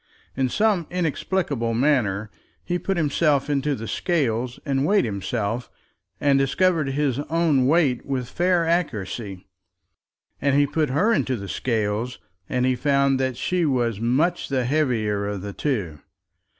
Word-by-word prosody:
In 130 -1 +1
some 205 - +1
inexplicable 155 -8 -1
manner 110 -6 +1 0.3
he 175 0 -2
put 195 0 -2
himself 150 -2 +1
into 145 0 0
the 115 -2 -7
scales 125 - -1
and 135 -2 0
weighed 200 +3 +3
himself, 110 +3 -3 0.5
and 140 -1 +3
discovered 155 +2 +2
his 140 -2 0
own 155 -6 +2
weight 145 -5 +2
with 130 -3 -3
fair 175 +2 +1
accuracy. 110 - -2 1.0
And 140 -1 +2
he 145 0 +5
put 150 +1 0
her 185 - +2
into 130 - 0
the 100 -3 -6
scales, 115 +2 -1 0.3
and 125 0 +1
he 130 0 +2
found 140 0 +2
that 130 -2 -1
she 180 +6 0
was 120 -8 0
much 150 +10 +1
the 130 -3 0
heavier 115 -8 0
of 100 -2 -4
the 100 -1 -5
two. 100 - -2
135 Hz, 145 wpm, -23 LUFS, 115-155 Hz, 1.0 s, he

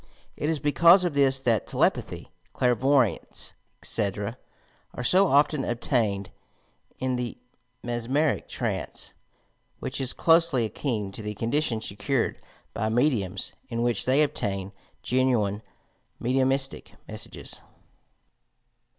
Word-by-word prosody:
It 150 - -2
is 160 - +1
because 170 +5 +5
of 175 -4 0
this 135 -2 +4
that 115 -4 +1
telepathy, - - 0 0.2
clairvoyance, 125 0 +1 0.3
etc., - - -1 0.6
are 125 - -4
so 190 +9 +5
often 145 0 +3
obtained 110 - -1 0.7
in 130 -1 -1
the 125 -1 -4 0.5
mesmeric 120 +6 0
trance, - - -4 0.6
which 135 +1 -4
is 130 - +1
closely 165 -7 +4
akin 110 -2 -2
to 100 - -8
the 105 0 -5
condition 115 +1 0
secured 115 +5 -1 0.3
by 110 - -1
mediums, 110 -7 0 0.2
in 115 0 -1
which 120 -4 +1
they 135 +4 +4
obtain 100 -8 -2 0.3
genuine 120 -6 +1 0.6
mediumistie 135 +2 0
messages. - - -5
125 Hz, 105 wpm, -26 LUFS, 110-140 Hz, 0.7 s, because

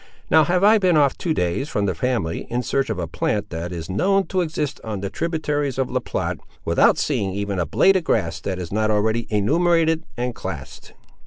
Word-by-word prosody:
Now 160 -1 +6
have 180 +3 +1
I 215 +2 +6
been 180 -4 +3
off 140 -3 +3
two 170 - -3
days 90 - -1
from 105 -9 0
the 95 - 0
family, 115 -5 -2
in 125 +1 -1
search 135 +1 0
of 110 - -2
a 90 - -2
plant, 100 +5 -2
that 85 +1 -4
is 85 -2 -5
known 195 - +2
to 185 -2 +1
exist 155 -3 -3
on 105 -3 -4
the 100 0 -4
tributaries 150 -5 -2
of 135 -1 -1
La 130 - +1
Platte, - - -3 0.3
without - - +4
seeing 95 -2 -1
even 100 -2 -2
a 85 - 0
blade 195 - +4
of 185 - +1
grass 85 - 0
that 95 +3 -3
is 90 -3 -6
not 110 +1 +1
already 110 +2 +1
enumerated 160 - +2
and 125 0 -2
classed." - - -8
125 Hz, 215 wpm, -22 LUFS, 100-160 Hz, 0.3 s, Now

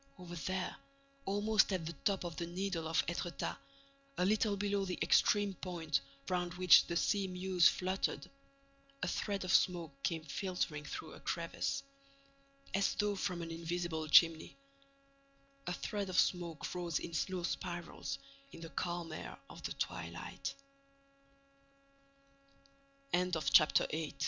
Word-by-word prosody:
—over 180 -2 -9
there, 185 +4 -2 0.5
almost 210 +2 +3
at 185 -4 -1
the 165 - -4
top 195 +5 0
of 170 -2 -5
the 170 - -2
Needle 175 -2 -2
of 160 0 +2
Étretat, 175 0 -3 0.6
a 180 - +2
little 210 0 +2
below 200 0 0
the 185 -2 -3
extreme 205 -1 +4
point 170 -5 -2 0.3
round 180 -1 -1
which 180 0 +7
the 170 - -2
sea 195 +2 +2
mews 180 -1 +4
fluttered, 185 +1 0 0.8
a - - +1
thread 200 -3 -1
of 185 - +1
smoke 170 -4 +3
came 165 +1 -1
filtering 155 -1 -2
through - - -6
a - - -11
crevice, 170 +11 -2 0.9
as 195 0 +2
though 205 -1 +1
from 180 -3 -2
an 165 - -6
invisible 165 -1 -2
chimney, 165 - +5 1.1
a 175 - 0
thread 200 +1 -3
of 185 - -2
smoke 170 -4 0
rose 175 -3 -1
in 170 - -5
slow 180 +3 -1
spirals 170 -6 -3 0.3
in 165 - -11
the 165 - -7
calm 170 +2 -3
air 155 - -6
of - - -11
the - - -3
twi - - -3
180 Hz, 130 wpm, -35 LUFS, 165-190 Hz, 1.1 s, which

